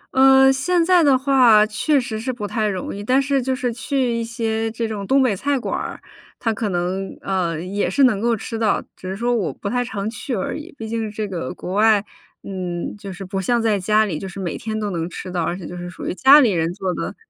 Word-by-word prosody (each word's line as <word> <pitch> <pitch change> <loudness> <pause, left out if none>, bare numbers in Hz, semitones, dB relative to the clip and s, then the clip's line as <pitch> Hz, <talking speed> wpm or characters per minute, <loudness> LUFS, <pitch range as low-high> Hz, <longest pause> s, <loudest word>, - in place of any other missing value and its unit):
嗯， 265 0 +7
现 335 +5 +1
在 360 -1 +5
的 275 -3 +5
话， 255 -6 +5
确 275 +7 +1
实 230 -4 -4
是 255 +3 -2
不 215 -4 -5
太 215 +1 -1
容 190 -1 -4
易。 205 - -6
但 255 +5 +3
是 275 -1 +1
就 260 +1 -1
是 250 -3 -2
去 255 -1 -1
一 230 0 -1
些 225 -1 -2
这 230 0 -3
种 205 -3 -5
东 270 0 +4
北 220 -6 +2
菜 280 +7 0
馆 255 - -3
儿， - - -5 0.4
它 225 -2 0
可 215 -1 -2
能， 185 +2 -3
呃， 175 -4 -1
也 195 +4 -2
是 280 - +2
能 215 -6 +3
够 235 0 +2
吃 225 +2 -5
到。 215 -3 +2 0.2
只 185 - -8
是 190 - -3
说 240 +1 0
我 180 -10 -1
不 200 - -7
太 245 0 0
常 210 -4 -4
去 235 +2 -4
而 190 - -3
已， 310 +4 -8
毕 225 - -6
竟 225 -1 -2
这 210 0 -4
个 170 -9 -4
国 180 - -6
外， 210 0 +4 0.4
嗯， 180 -2 -4
就 200 -2 -8
是 185 +1 -8
不 190 +1 -3
像 240 +5 +1
在 215 -3 +1
家 215 +3 +3
里， 160 -7 -3
就 195 - -6
是 195 - -9
每 175 -4 -3
天 220 -1 -4
都 205 -2 -2
能 170 0 -3
吃 185 - -7
到， 175 -2 -1
而 175 +2 -2
且 175 - -9
就 180 - -7
是 175 0 -6
属 185 - -9
于 - - -2
家 270 +8 +7
里 230 -6 +4
人 165 -1 0
做 190 -3 -2
的 - - -4
215 Hz, 275 characters per minute, -21 LUFS, 190-250 Hz, 0.4 s, 嗯